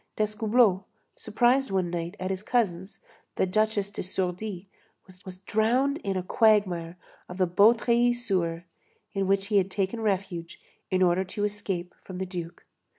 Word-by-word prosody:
D'Escoubleau, 215 -1 +2 0.3
surprised 245 +5 +2
one 185 -3 0
night 170 0 -4
at 185 +1 -2
his 190 -1 -3
cousin's, 200 -5 -1 0.3
the - - +2
Duchesse 205 +1 0
de - - -5
Sourdis', 185 +1 -3 0.6
was 185 -2 -9
drowned 245 +9 +1
in 195 -2 -2
a 185 - -2
quagmire 185 -6 +2 0.3
of 180 - -8
the 185 - +3
Beautreillis 235 +6 +4
sewer, 170 -3 -1 0.5
in 195 -1 -1
which 195 0 +2
he 210 - +3
had 190 -1 +2
taken 195 +4 -2
refuge 190 -5 -2 0.3
in 185 0 +2
order 180 +1 +3
to 205 +2 -4
escape 200 -4 -3
from 185 - -8
the 190 - -2
Duke. 175 -2 -7
195 Hz, 150 wpm, -27 LUFS, 180-215 Hz, 0.6 s, Beautreillis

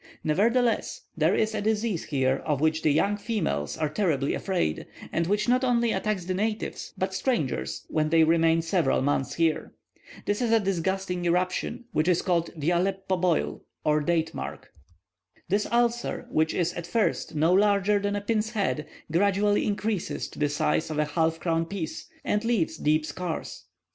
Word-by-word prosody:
Nevertheless, 230 +8 +1
there 160 +3 +2
is 220 0 +1
a 210 - -2
disease 215 -3 0
here 135 -2 +1
of 150 -2 -2
which 155 +1 +1
the - - +2
young 200 +8 +2
females 75 - -2
are 155 - 0
terribly 150 -6 0
afraid, 180 - -1 0.2
and 170 0 0
which 205 +2 +1
not 250 +2 +3
only 235 -2 +2
attacks 210 -6 -1
the 185 - -1
natives, 215 +3 -3
but - - -1
strangers, 235 - -1
when 155 -1 0
they 165 0 +5
remain 165 0 +3
several 165 -7 +1
months 135 -2 0
here. 165 -2 0 0.5
This 205 +3 0
is 235 -2 +1
a 225 - +5
disgusting 190 -1 -1
eruption, 185 +7 0
which 155 +2 +1
is 180 -2 +3
called 170 -2 +1
the 155 +3 0
Aleppo 190 +2 0
Boil, 180 -2 0 0.2
or 150 0 +2
Date 165 +1 0
mark. - - -7 0.8
This 205 +2 +1
ulcer, 240 0 0
which 160 0 +1
is 175 -1 0
at 175 -1 -6
first 220 -5 0
no 160 +4 +3
larger 205 +1 +3
than 205 0 -1
a 205 - -2
pin's 215 +1 0
head, 190 -8 -1 0.2
gradually 200 +4 +2
increases 205 -2 -2
to - - -12
the 145 -1 +2
size 145 +2 0
of 155 - -3
a 150 - +2
halfcrown 165 +1 0
piece, 190 -5 -5 0.2
and 210 +1 +1
leaves 230 -8 +1
deep 155 +1 +2
scars. 165 +2 -5
180 Hz, 170 wpm, -27 LUFS, 160-210 Hz, 0.8 s, they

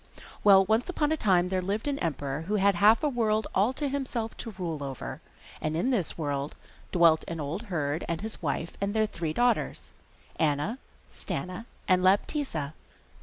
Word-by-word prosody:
Well, 195 -2 +7
once 220 - +1
upon 310 -4 0
a - - +3
time 185 - +2
there 185 0 0
lived 205 +7 -2
an 280 -1 -1
emperor 145 -1 -2
who 210 - 0
had 200 0 +4
half 210 - +5
a - - +3
world 220 -5 +1
all 205 +6 +3
to 290 +2 -1
himself 260 -5 -3
to 225 -4 -6
rule 165 -6 -3
over, 135 -2 -6 0.4
and 155 +1 -1
in 245 +10 +1
this 200 -10 +1
world 145 -2 -2 0.4
dwelt 165 -3 +5
an 165 -1 -4
old 155 +7 -3
herd 155 -2 -1
and 165 -1 -1
his 220 +1 -2
wife 160 +1 -2
and 200 +2 -1
their 220 0 +3
three 170 -6 -3
daughters, 245 +8 0 0.5
Anna, 155 - 0 0.3
Stana, 185 +5 -5 0.2
and 185 -1 +4
Laptitza. 185 - +1
190 Hz, 175 wpm, -28 LUFS, 160-220 Hz, 0.5 s, Well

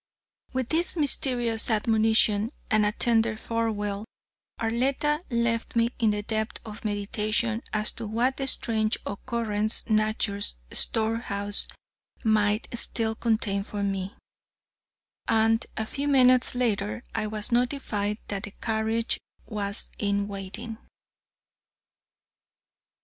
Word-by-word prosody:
With 260 -2 -2
this 345 +2 +3
mysterious 245 -6 +5
admonition 220 -1 +3 0.2
and 215 -1 +4
a - - +1
tender 225 -1 +2
farewell, 215 -3 -2 0.5
Arletta 265 +6 +1
left 235 -1 0
me 230 0 +3
in 225 -3 +3
the 210 0 -1
depth 220 +1 -2
of 215 -1 -9
meditation 215 +2 -1
as 215 0 +1
to 230 - -6
what 240 +5 0
strange 220 -2 +1
occurrence 215 0 -2
nature's 215 -2 0 0.2
storehouse 220 -2 +1 0.6
might 215 -1 +2
still 225 -1 +1
contain 220 -3 0
for 205 0 -4
me, 195 0 -2 1.1
and 225 0 +3
a 220 - -1
few 280 +6 -3
minutes 255 -3 +5
later 220 -2 -1
I 220 -1 -1
was 215 +1 -2
notified 235 -5 0
that 200 -1 -2
the 205 -1 -8
carriage 225 0 0 0.3
was 200 -1 -2
in 200 -1 0
waiting. 205 +3 -7
220 Hz, 110 wpm, -27 LUFS, 210-235 Hz, 1.1 s, mysterious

